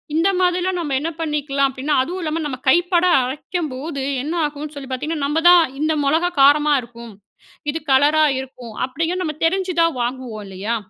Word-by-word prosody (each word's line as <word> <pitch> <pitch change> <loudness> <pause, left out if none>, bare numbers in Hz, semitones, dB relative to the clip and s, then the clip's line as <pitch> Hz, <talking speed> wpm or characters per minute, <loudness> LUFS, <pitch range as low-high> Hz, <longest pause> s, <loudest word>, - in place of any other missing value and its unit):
இந்த 330 +5 +3
மாதிரிலாம் 360 0 +1
நம்ம 295 -5 -2
என்ன 320 - -2
பண்ணிக்கலாம் 285 -3 0
அப்பிடின்னா, 270 +3 -2
அதுவும் 360 +6 -5
இல்லாம 320 +1 -2
நம்ம 270 -3 -4
கைப்பட 350 +4 +3 0.2
அரைக்கும்போது, 285 +1 -4 0.2
என்ன 305 +3 -3
ஆகுன்னு 295 0 -6
சொல்லி 275 -2 -8
பார்த்தீங்கன்னா, 295 +3 -2
"நம்ம 300 +3 0
தான் 355 -1 +7 0.2
இந்த 315 +1 +1
மொளகா 320 +5 +2
காரமா 295 +2 +5
இருக்கும். 235 -1 -12 0.6
இது 325 - -4
கலரா 295 +4 +4 0.2
இருக்கும்" 250 -3 -9
அப்பிடிங்க 325 +7 -2
நம்ம 310 -3 -3
தெரிஞ்சு 375 +2 0
தான் 330 -3 +2
வாங்குவோம் 240 -3 -4
இல்லயா? 195 +4 -3
295 Hz, 165 wpm, -20 LUFS, 265-330 Hz, 0.6 s, தான்